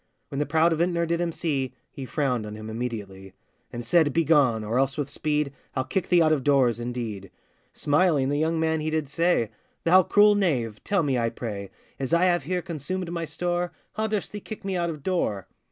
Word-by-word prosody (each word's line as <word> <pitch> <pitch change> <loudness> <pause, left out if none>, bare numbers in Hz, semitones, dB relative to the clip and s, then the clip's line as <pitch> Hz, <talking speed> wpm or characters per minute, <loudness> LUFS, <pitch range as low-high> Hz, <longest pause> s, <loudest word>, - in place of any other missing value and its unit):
When 140 - -4
the 150 - 0
proud 160 +3 +3
vintner 170 +1 +1
did 170 +1 0
him 170 -1 0
see, 140 -6 -2 0.2
He 135 - -7
frowned 125 -5 -1
on 105 - -7
him 110 0 -7
immediately, 105 -5 -5 0.4
And 120 0 -6
said, 155 +4 +4
'Begone! 145 -9 +3
or 115 +4 0
else 135 +1 +1
with 145 -1 -3
speed, 150 -2 -1 0.2
I'll 130 - +1
kick 185 +6 -2
thee 175 -2 +5
out 155 0 +4
of 140 -4 0
doors, 130 -5 +3
indeed.' 115 -5 -5 0.4
Smiling, 145 -3 +2
the 145 +1 0
young 160 +1 +1
man 160 0 +1
he 155 +1 -2
did 155 -3 -1
say, 165 -8 +1 0.3
'Thou 185 +3 +6
cruel 205 +3 +5
knave! 130 - 0
tell 200 -4 +1
me, 135 -4 +1
I 115 0 +1
pray, 105 -4 -6 0.3
As 135 +4 +1
I 175 +2 +4
have 175 -6 +2
here 180 +1 -1
consumed 175 +2 -4
my 170 -1 -2
store, 175 +3 -2 0.2
How 220 +1 -1
durst 210 -3 -2
thee 210 - -5
kick 215 0 -9
me 195 -1 -1
out 170 -1 0
of 150 -4 -6
door? 105 - -1
150 Hz, 210 wpm, -26 LUFS, 125-170 Hz, 0.4 s, Thou